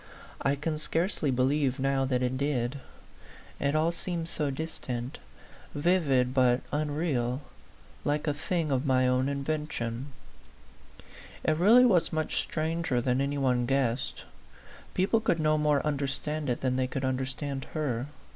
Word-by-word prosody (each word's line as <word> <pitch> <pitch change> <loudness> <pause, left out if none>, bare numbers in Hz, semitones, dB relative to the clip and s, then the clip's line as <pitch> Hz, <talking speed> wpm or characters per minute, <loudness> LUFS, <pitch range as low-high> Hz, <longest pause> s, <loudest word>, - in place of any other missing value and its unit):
I 140 +1 +2
can 155 +2 -2
scarcely 165 -1 0
believe 130 +1 +1
now 135 0 +1
that 130 -1 0
it 125 +1 0
did: 135 -1 -1 0.8
it 140 +2 +1
all 160 +2 +3
seems 170 -1 -3
so 150 -2 -1
distant, 135 -4 -5 0.6
vivid 145 -6 +2
but 125 -1 +3
unreal, 145 -4 -1 0.6
like 150 +1 0
a 150 - +1
thing 160 +1 -1
of 130 -1 +1
my 130 -3 +3
own 130 +2 +2
invention. 140 -4 -3 1.4
It 155 - +2
really 220 +10 +7
was 185 -9 +3
much 155 -1 -1
stranger 160 -4 -1
than 125 +2 +1
any 140 +1 -1
one 125 -3 +1
guessed. 135 -2 0 0.7
People 195 +5 +3
could 170 -7 +1
no 155 0 +3
more 150 -2 +2
understand 150 +1 -1
it 120 - -1
than 130 -1 0
they 130 0 +1
could 135 +1 -3
understand 135 +1 -2
her. 135 -5 -1
140 Hz, 140 wpm, -29 LUFS, 130-155 Hz, 1.4 s, really